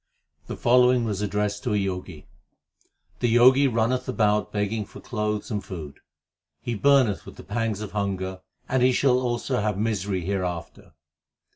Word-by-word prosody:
The -, -, -6 dB
following 125 Hz, 0 st, +4 dB
was 105 Hz, -3 st, -2 dB
addressed 105 Hz, 0 st, -1 dB
to 105 Hz, -, 0 dB
a -, -, +2 dB
Jogi: 90 Hz, -4 st, -6 dB, 0.9 s
The 120 Hz, -1 st, +1 dB
Jogi 130 Hz, +3 st, +6 dB
runneth 125 Hz, +2 st, 0 dB
about 105 Hz, -3 st, +1 dB
begging 105 Hz, +1 st, -1 dB
for -, -, -13 dB
clothes 105 Hz, -3 st, -3 dB
and 105 Hz, -2 st, -2 dB
food; 80 Hz, -7 st, -8 dB, 0.6 s
He 120 Hz, -, -4 dB
burneth 130 Hz, -3 st, +3 dB
with -, -, -12 dB
the -, -, -11 dB
pangs 110 Hz, -1 st, -2 dB
of 105 Hz, -, -6 dB
hunger, 95 Hz, -2 st, -3 dB, 0.3 s
and 130 Hz, 0 st, +1 dB
he 130 Hz, +1 st, +4 dB
shall 125 Hz, -1 st, +3 dB
also 125 Hz, 0 st, -1 dB
have 105 Hz, -2 st, -1 dB
misery 100 Hz, -3 st, -1 dB
hereafter. 90 Hz, -2 st, -4 dB
105 Hz, 155 wpm, -25 LUFS, 100-120 Hz, 0.9 s, Jogi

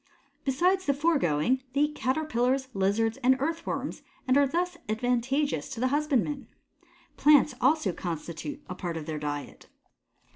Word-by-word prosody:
Besides 360 Hz, +8 st, +2 dB
the 280 Hz, -, +3 dB
foregoing 260 Hz, -, +2 dB
they 280 Hz, -, +1 dB
eat 295 Hz, 0 st, +2 dB
Caterpillars, 260 Hz, -2 st, 0 dB
Lizards, 205 Hz, +4 st, +1 dB
and 260 Hz, 0 st, +3 dB
Earthworms 325 Hz, +4 st, -3 dB, 0.3 s
and 255 Hz, -, +4 dB
are 285 Hz, 0 st, +5 dB
thus 350 Hz, +4 st, -1 dB
advantageous 245 Hz, -, 0 dB
to -, -, -6 dB
the 255 Hz, +2 st, +2 dB
husbandman. 290 Hz, -1 st, 0 dB, 0.7 s
Plants 295 Hz, -1 st, +5 dB
also 265 Hz, -, +3 dB
constitute 175 Hz, -, -5 dB
a 180 Hz, -, -5 dB
part 175 Hz, -2 st, -4 dB
of 155 Hz, -, -6 dB
their 155 Hz, -1 st, -4 dB
diet. 145 Hz, -1 st, -6 dB
260 Hz, 140 wpm, -28 LUFS, 200-295 Hz, 0.7 s, are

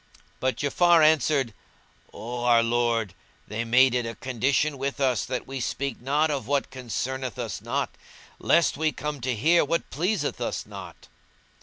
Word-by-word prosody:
But 130 Hz, 0 st, 0 dB
Ja'afar 170 Hz, +3 st, +4 dB
answered, 150 Hz, -6 st, +2 dB, 0.6 s
"O 120 Hz, +2 st, -6 dB
our 120 Hz, -1 st, +5 dB
lord, 115 Hz, -4 st, 0 dB, 0.3 s
they 110 Hz, +3 st, -3 dB
made 125 Hz, +2 st, +4 dB
it 125 Hz, -1 st, +1 dB
a 115 Hz, -, -5 dB
condition 135 Hz, +4 st, 0 dB
with 140 Hz, +1 st, -3 dB
us 130 Hz, -3 st, +1 dB
that 130 Hz, -1 st, -4 dB
we 135 Hz, 0 st, -6 dB
speak 135 Hz, 0 st, -3 dB
not 150 Hz, +4 st, +1 dB
of 135 Hz, -6 st, -3 dB
what 140 Hz, -1 st, 0 dB
concerneth 130 Hz, 0 st, -4 dB
us 120 Hz, -3 st, -4 dB
not, -, -, -2 dB, 0.5 s
lest 170 Hz, -4 st, +3 dB
we 155 Hz, +1 st, +1 dB
come 150 Hz, -2 st, -5 dB
to 125 Hz, 0 st, -1 dB
hear 165 Hz, +10 st, +4 dB
what 165 Hz, +3 st, -2 dB
pleaseth 185 Hz, +8 st, -1 dB
us -, -, -3 dB
not." -, -, -11 dB
130 Hz, 160 wpm, -26 LUFS, 120-150 Hz, 0.6 s, our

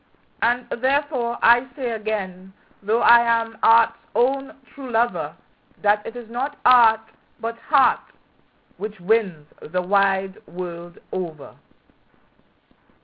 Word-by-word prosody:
And 240 Hz, +1 st, +1 dB
therefore 265 Hz, -3 st, 0 dB
I 240 Hz, +2 st, +5 dB
say 250 Hz, -4 st, -3 dB
again, 195 Hz, -4 st, -5 dB, 0.3 s
though 220 Hz, +4 st, 0 dB
I 235 Hz, -, +8 dB
am 230 Hz, -1 st, -1 dB
art's 230 Hz, 0 st, +4 dB, 0.2 s
own 270 Hz, +2 st, 0 dB
true 270 Hz, -2 st, -9 dB
lover, 235 Hz, +1 st, -1 dB, 0.5 s
That 210 Hz, 0 st, +2 dB
it 225 Hz, -, -8 dB
is 240 Hz, -2 st, -9 dB
not 260 Hz, +5 st, -4 dB
art, 230 Hz, -3 st, +6 dB, 0.4 s
but 230 Hz, 0 st, -5 dB
heart, 285 Hz, -3 st, +3 dB, 0.8 s
which 210 Hz, -1 st, -7 dB
wins 185 Hz, -5 st, 0 dB, 0.2 s
the 180 Hz, +3 st, -3 dB
wide 195 Hz, 0 st, 0 dB
world 175 Hz, 0 st, -8 dB
over. 165 Hz, -6 st, -6 dB
225 Hz, 115 wpm, -22 LUFS, 195-240 Hz, 0.8 s, I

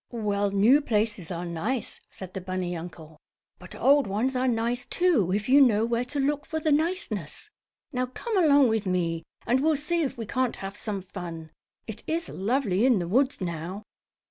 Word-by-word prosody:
"Well, 205 Hz, -3 st, -1 dB
new 215 Hz, +9 st, +5 dB
places 210 Hz, -, 0 dB
are 175 Hz, -1 st, -4 dB
nice," 170 Hz, +9 st, -3 dB
said 185 Hz, -1 st, -10 dB
the 190 Hz, -, -5 dB
bunny 185 Hz, -1 st, -3 dB
uncle, 160 Hz, -2 st, -9 dB, 0.4 s
"but -, -, -11 dB
old 280 Hz, -2 st, +4 dB
ones 225 Hz, +7 st, -1 dB
are 255 Hz, +1 st, +1 dB
nice, 240 Hz, +1 st, 0 dB
too, 305 Hz, -, +2 dB
if 205 Hz, +2 st, -1 dB
you 275 Hz, +3 st, +6 dB
know 225 Hz, -4 st, +4 dB
where 235 Hz, +1 st, 0 dB
to 285 Hz, +3 st, -3 dB
look 290 Hz, +1 st, 0 dB
for 315 Hz, -, -2 dB
the 310 Hz, 0 st, 0 dB
niceness. 305 Hz, -, -2 dB, 0.4 s
Now 250 Hz, 0 st, 0 dB
come 440 Hz, -, -5 dB
along 285 Hz, -3 st, +6 dB
with 220 Hz, -2 st, 0 dB
me, 170 Hz, -3 st, 0 dB, 0.2 s
and 250 Hz, +2 st, +2 dB
we'll 310 Hz, +3 st, +2 dB
see 330 Hz, +4 st, -1 dB
if 280 Hz, -6 st, -2 dB
we 230 Hz, -, -4 dB
can't 255 Hz, +2 st, -1 dB
have 195 Hz, +1 st, -7 dB
some 205 Hz, -3 st, -4 dB
fun. 170 Hz, -4 st, -8 dB, 0.3 s
It 220 Hz, -2 st, -7 dB
is 330 Hz, +1 st, -2 dB
lovely 210 Hz, -1 st, 0 dB
in 255 Hz, -3 st, +5 dB
the 175 Hz, -2 st, -2 dB
woods 260 Hz, +5 st, +1 dB
now." 175 Hz, +3 st, -4 dB
225 Hz, 190 wpm, -26 LUFS, 185-270 Hz, 0.4 s, you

